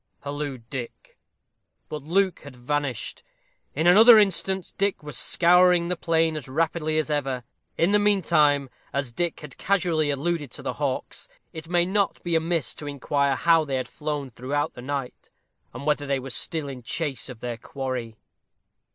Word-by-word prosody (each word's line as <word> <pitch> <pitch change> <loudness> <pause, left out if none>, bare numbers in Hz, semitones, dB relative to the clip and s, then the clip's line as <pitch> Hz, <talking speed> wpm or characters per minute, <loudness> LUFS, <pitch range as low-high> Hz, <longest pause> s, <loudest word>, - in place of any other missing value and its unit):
hallooed 140 -4 -5
Dick. 125 -4 -8 0.7
But 150 - -6
Luke 185 +5 +1
had 140 -3 -12
vanished. 135 0 -3 0.5
In 160 +4 0
another 220 +6 +9
instant 190 -2 +1
Dick 200 -4 0
was 150 -1 -6
scouring 175 0 +4
the 180 - 0
plain 165 -1 +1
as 150 -3 -6
rapidly 155 +2 0
as 155 -1 0
ever. 135 -4 -1 0.3
In 170 +4 +3
the 210 - +5
mean 205 -2 +3
time, 145 -5 +3 0.2
as 140 -2 -2
Dick 170 +7 -2
has 150 -2 -9
casually 170 -6 +1
alluded 145 +1 -1
to - - -8
the - - -2
hawks, - - -3 0.3
it 160 0 -9
may 175 -1 +3
not 195 +1 0
be 170 -1 0
amiss 165 -2 +1
to 150 - -9
inquire 140 0 0
how 165 +2 +4
they 140 -3 -3
had 130 - -2
flown 150 -3 -4
throughout 140 +5 -2
the 120 - -10
night, 135 -1 -5 0.4
and 130 +3 -8
whether 150 -1 0
they 140 0 +1
were 135 0 -6
still 155 +5 -1
in 130 -2 -7
chase 140 +1 -3
of 125 -3 -9
their 120 -1 -4
quarry. 125 -3 -5
150 Hz, 170 wpm, -25 LUFS, 135-170 Hz, 0.7 s, another